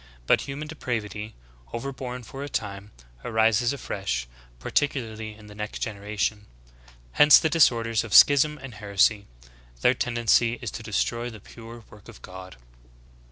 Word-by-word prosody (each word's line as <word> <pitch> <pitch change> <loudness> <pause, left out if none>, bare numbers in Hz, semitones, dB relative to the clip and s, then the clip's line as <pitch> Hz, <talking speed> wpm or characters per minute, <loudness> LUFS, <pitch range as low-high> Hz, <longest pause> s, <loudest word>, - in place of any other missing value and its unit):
But - - +3
human 145 +3 -6
depravity, 110 -7 -5 0.4
over 135 +4 -4
born 125 -1 -6
for 135 +4 -8
a 145 - -6
time, 100 -4 -4 0.3
arises 110 +2 +2
afresh, 95 - -3 0.3
par - - -8
ticularly 110 -7 -2
in 105 - -15
the 105 - -12
next 105 0 -6
generation. 105 0 -3 0.6
Hence 150 - +8
the 160 - 0
disorders 115 -8 +3
of 110 -4 -2
schism 150 +2 +6
and 135 -4 -10
heresy. 100 0 +1 0.5
Their - - +4
tendency 120 -1 +2
is - - -5
to - - -7
destroy 115 - -2
the 110 -2 -11
pure 115 +3 -12
work 105 -2 -16
of - - -14
God." 95 0 -10
110 Hz, 150 wpm, -25 LUFS, 105-125 Hz, 0.6 s, Hence